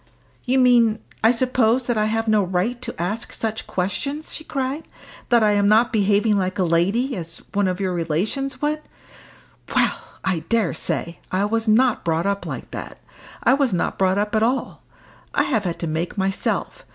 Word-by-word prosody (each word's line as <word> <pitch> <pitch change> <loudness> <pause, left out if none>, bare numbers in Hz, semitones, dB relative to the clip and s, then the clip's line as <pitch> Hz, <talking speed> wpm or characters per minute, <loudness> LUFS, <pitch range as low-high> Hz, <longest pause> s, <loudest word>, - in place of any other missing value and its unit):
"You 260 +1 +2
mean, 240 -4 +5 0.3
I 225 - +7
suppose, 250 0 +2
that 240 - 0
I 215 -1 +2
have 225 +1 -1
no 215 -1 +4
right 190 +7 -1
to - - -6
ask 205 +7 -3
such 220 -1 -3
questions!" 280 - -3
she 315 - -5
cried; 275 +1 -3 0.5
"that 235 -2 +5
I 210 - +4
am 205 -1 +3
not 225 +4 +4
behaving 205 0 +3
like 185 +1 -2
a 190 - +2
lady 195 +11 +1
as 165 -3 -5 0.2
one 200 -1 +2
of 185 0 -2
your 190 -2 -1
relations 185 - -2
would? 305 +1 0 0.9
Well, - - +3 0.3
I 185 -3 +1
dare 225 -7 +2
say! 170 +1 -3
I 190 +2 +1
was 225 +2 0
not 235 +2 +3
brought 165 +1 0
up 200 0 -1
like - - -6
that. - - -7 0.5
I - - +5
was 275 -5 +2
not 175 - -1
brought 190 0 +3
up 210 +1 0
at 215 - +3
all; 245 +4 0 0.5
I - - +4
have 220 -7 0
had 170 -2 -2
to - - -1
make 160 +5 -3
myself. 195 - -1
215 Hz, 190 wpm, -22 LUFS, 185-245 Hz, 0.9 s, I